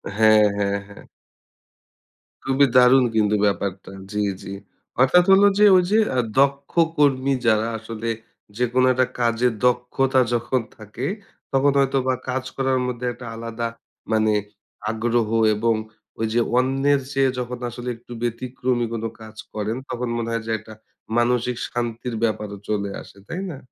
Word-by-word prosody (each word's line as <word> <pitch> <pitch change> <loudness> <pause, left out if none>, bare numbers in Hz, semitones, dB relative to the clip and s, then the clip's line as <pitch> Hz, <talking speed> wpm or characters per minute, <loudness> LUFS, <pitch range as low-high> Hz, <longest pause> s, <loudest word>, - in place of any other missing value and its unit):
হ্যাঁ, 110 0 +6 0.2
হ্যাঁ, 100 0 0
হ্যাঁ। 100 - -14 1.4
খুবই 135 +1 +3
দারুণ 125 +1 +6
কিন্তু 105 -1 +3
ব্যাপারটা। 95 -1 -2 0.2
জ্বি, 105 0 0 0.2
জ্বি। 95 - -7 0.5
অর্থাৎ 175 +7 +6
হলো 200 +1 +7
যে 210 - +6
ঐ - - +8
যে 215 +2 +4 0.2
আ - - +4 0.2
দক্ষ 140 0 +2 0.3
কর্মী 140 -2 +3
যারা 110 0 +3
আসলে 115 +1 -5 0.5
যেকোনো 125 +1 +2
একটা 130 0 +2
কাজের 120 0 +2
দক্ষতা 125 +2 +2
যখন 120 +2 0 0.2
থাকে 110 +4 -7 0.5
তখন 140 +1 +4
হয়তো 135 0 +2
বা 130 - +2
কাজ 130 +1 -1
করার 130 -1 +1
মধ্যে 125 0 -4
একটা 120 +1 -11
আলাদা 115 0 -4 0.4
মানে 110 -1 +3 0.6
আগ্রহ 115 0 0 0.3
এবং 115 +2 +1 0.4
ওই 115 - 0
যে 120 - +3 0.2
অন্যের 135 +2 +2
চেয়ে 135 -1 +2
যখন 125 0 -4
আসলে 120 +1 -6
একটু 120 - -18
ব্যতিক্রমী 120 +1 -1
কোনো 115 0 -2
কাজ 110 0 -11 0.2
করেন 105 +1 -2
তখন 125 0 -3
মনে 115 0 -3
হয় 115 -1 -2
যে 115 - -2
একটা 110 +1 -13 0.4
মানসিক 120 0 +1
শান্তির 120 0 -3
ব্যাপারও 105 -2 -2
চলে 100 -1 -1
আসে। - - -15
তাই 180 +3 -4
না? 145 - -6
120 Hz, 150 wpm, -22 LUFS, 110-130 Hz, 1.4 s, ঐ